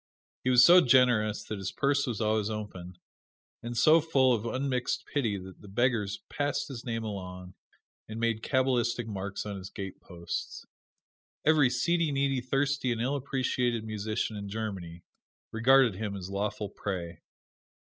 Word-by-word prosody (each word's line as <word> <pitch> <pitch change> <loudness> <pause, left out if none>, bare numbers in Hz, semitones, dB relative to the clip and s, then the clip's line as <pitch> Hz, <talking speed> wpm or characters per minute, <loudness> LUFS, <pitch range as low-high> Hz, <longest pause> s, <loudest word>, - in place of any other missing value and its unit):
He 130 - +1
was 125 -1 +7
so 180 +1 +8
generous 120 -5 +3
that 105 -1 -5
his 95 0 -4
purse 140 0 +1
was 115 -4 -3
always 110 -1 +1
open, 95 -5 -6 0.6
and 120 0 -5
so 155 +7 +6
full 135 -5 +3
of 115 0 -2
unmixed 130 -2 -1
pity 115 -9 -1
that 95 0 -11
the 105 - -13
beggars 105 -1 0
passed 145 0 -2
his 125 -3 -7
name 115 -3 -3
along 90 -3 -7 0.6
and 110 +1 -6
made 115 -1 0
cabalistic 125 -2 +1
marks 100 -1 -5
on 100 -1 -5
his 95 0 -8
gateposts. 90 -3 -6 0.8
Every 150 -4 +5
seedy, 165 +6 +1
needy, 135 -1 0
thirsty 135 0 0
and 115 - -2
ill 130 +5 0
appreciated 125 -4 -1
musician 110 +1 -3
in 100 -1 -6
Germany 95 -6 -5 0.5
regarded 125 +1 +5
him 100 +1 -4
as 95 -1 -7
lawful 100 +1 -2
prey. 90 -4 -5
115 Hz, 150 wpm, -29 LUFS, 100-130 Hz, 0.8 s, so